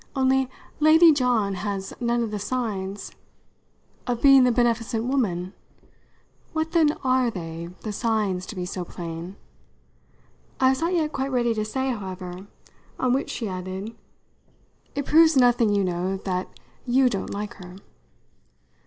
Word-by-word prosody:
Only, 265 -1 +2 0.3
Lady 320 +2 +7
John 245 -8 +1
has 195 0 -4
none 235 0 +1
of 225 - -4
the 210 - -3
signs 205 -4 -3 0.5
" - - -38
"Of 245 -1 -1
being 275 -1 +7
the 250 - +4
beneficent 230 -1 +1
woman? 200 -8 -1 1.0
What 320 0 -1
then 315 -3 +4
are 255 -1 +2
they 170 -4 -6
the 215 - -4
signs 205 -5 -1
to - - -7
be 180 -1 -3
so 180 0 -4
plain?" 170 +1 -7 1.2
I 260 - +5
was 265 +3 0
not 340 +2 +1
yet 310 -3 0
quite 270 +1 -2
ready 240 -2 +1
to 215 -1 -2
say, 260 +5 -2
however; 185 -3 -6 0.5
on 255 -1 +2
which 270 - -1
she 230 - -3
added: 190 +3 -5 1.0
"It 285 -1 -2
proves 320 -1 +5
nothing, 245 -3 +4
you 200 - +2
know, 185 +1 -1
that 185 -1 -3 0.4
you 255 +2 +4
don't 200 -6 -2
like 205 +1 -5
her." 180 -2 -11
230 Hz, 150 wpm, -24 LUFS, 190-260 Hz, 1.2 s, Lady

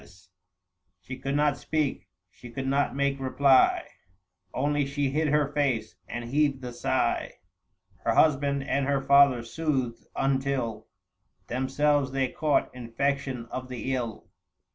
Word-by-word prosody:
.870 90 -1 -20 0.7
She 130 +6 -8
could 135 +1 -2
not 145 -1 +2
speak, 140 - -2 0.2
she 120 - -12
could 135 +3 -5
not 140 +1 +1
make 140 0 0
reply; 135 0 +3 0.6
Only 145 +2 0
she 140 -1 -1
hid 155 +2 +1
her 150 -1 +2
face, 130 -7 0
and 120 0 -5
heaved 140 +1 +1
the 125 -1 -6
sigh: - - 0 0.7
Her - - +1
husband 140 -2 +3
and 140 -1 0
her 140 -1 +1
father 140 -3 +5
soothed, 130 -2 -2
until 135 -4 -1 0.6
Themselves 135 +2 +1
they 135 -1 0
caught 150 -2 0
infection 125 +1 -2
of 130 0 -5
the 130 +1 -3
ill. 120 -4 -4
135 Hz, 135 wpm, -27 LUFS, 125-140 Hz, 0.7 s, father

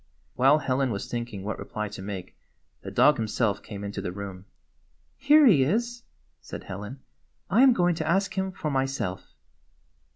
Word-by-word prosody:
While 135 +4 +5
Helen 135 -2 0
was 100 -3 -3
thinking 120 -5 -4
what 105 +2 -4
reply 105 0 -4
to 100 -1 -8
make 95 -2 -7 0.5
the - - -7
dog - - +4
himself 110 -2 0
came 100 -1 -8
into 100 0 -4
the 90 - -4
room. 95 -1 -8 0.7
"Here 295 +3 +5
he 185 - +6
is," 235 - -1 0.4
said - - -8
Helen. 105 +8 -8 0.5
"I 215 +7 +5
am 265 -1 +8
going 175 -6 +2
to 160 - -4
ask 195 +3 +1
him 190 0 -1
for 155 -4 -4
myself." 135 -9 -3
130 Hz, 165 wpm, -26 LUFS, -, 0.7 s, am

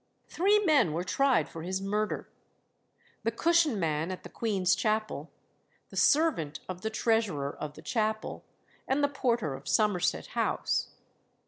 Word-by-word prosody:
Three 400 +4 +3
men 300 - +3
were 170 +3 -1
tried 270 +6 +2
for 165 - -8
his 185 +3 -2
murder 210 +2 -2 0.9
the - - +1
cushion 320 -1 +2
man 160 -1 0
at 185 - -6
the - - -9
Queen's 195 -6 +1
Chapel, 215 -1 -1 0.6
the - - -10
servant 280 - +2
of 185 -1 -6
the 220 - -2
treasurer 220 - 0
of 150 -1 -6
the - - -12
chapel, 220 -2 -2 0.4
and 275 +2 +1
the - - +5
porter 240 - 0
of 135 +1 -9
Somerset 205 -5 +1
House. - - 0
215 Hz, 145 wpm, -29 LUFS, 180-265 Hz, 0.9 s, the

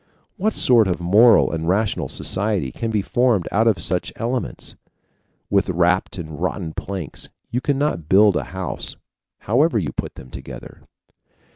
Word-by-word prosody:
What 215 +3 0
sort 115 -5 +4
of 90 -2 -1
moral 105 +7 +5
and 80 0 -3
rational 100 +2 0
society 95 -8 -1
can 115 - -4
be 105 -3 0
formed 120 -8 +1
out 110 +3 +2
of 110 -4 +3
such 90 -1 -2
elements? 120 +2 -4 0.8
With 100 -1 +2
warped 90 +2 +1
and 80 -2 -7
rotten 90 -3 -2
planks 95 -5 -6 0.2
you 125 - -1
cannot 140 - -1
build 100 0 +5
a - - -1
house, 95 0 -3 0.5
however 130 - +2
you 80 -9 -1
put - - -5
them 65 - -12
together. - - -10
100 Hz, 150 wpm, -21 LUFS, 90-115 Hz, 0.8 s, moral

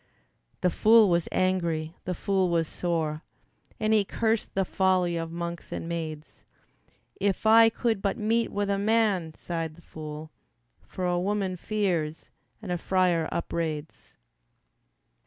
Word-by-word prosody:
The 180 - +2
fool 220 +1 +6
was 170 -1 +1
angry, 170 -3 0
the 180 - -2
fool 190 -1 +1
was 165 -2 +1
sore, 160 -3 -2 0.6
And 215 0 +2
he 215 -2 +4
cursed 225 +2 -1
the 195 0 +2
folly 185 -2 +2
of 165 -1 -3
monks 170 0 -5
and - - -4
maids. 160 -2 -6 0.7
"If 200 +1 -1
I 225 +1 +8
could 225 -2 -1
but 200 -1 0
meet 225 +2 +1
with 205 0 -1
a 200 - 0
man," 200 -7 +1
sighed 165 -2 -4
the 170 - -16
fool, 155 0 -8 0.6
"For 185 - -4
a 175 0 +1
woman 195 0 -1
fears, 175 -6 -2 0.3
and 190 - -5
a 175 - -1
friar 180 -3 +1
upbraids." 160 -2 -4
180 Hz, 140 wpm, -27 LUFS, 165-200 Hz, 0.7 s, I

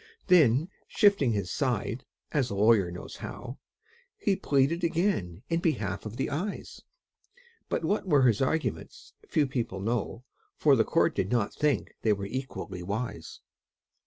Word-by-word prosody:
Then 155 -4 +5 0.2
shifting 200 - +3
his 100 -4 -2
side 120 -3 -1 0.3
(as 135 -4 +1
a 100 - -4
lawyer 105 -2 +4
knows 90 +1 -8
how), 120 +6 -8 0.6
He 205 - +1
pleaded 155 -1 +1
again 165 - 0
in 165 0 0
behalf 150 - -1
of 110 +2 -8
the 135 - -2
Eyes; 180 +9 -4 0.9
But - - -1
what 200 +3 0
were 145 -6 +4
his 120 -3 +3
arguments 155 +4 -2
few 150 - +2
people 120 -7 -3
know, 115 +3 -2 0.3
For - - +4
the - - +4
court - - +2
did 95 - -2
not 115 -4 +1
think 150 -7 0
they 110 - +3
were 100 -1 -4
equally 105 -5 -5
wise. 100 -2 -5
125 Hz, 150 wpm, -28 LUFS, 105-155 Hz, 0.9 s, Then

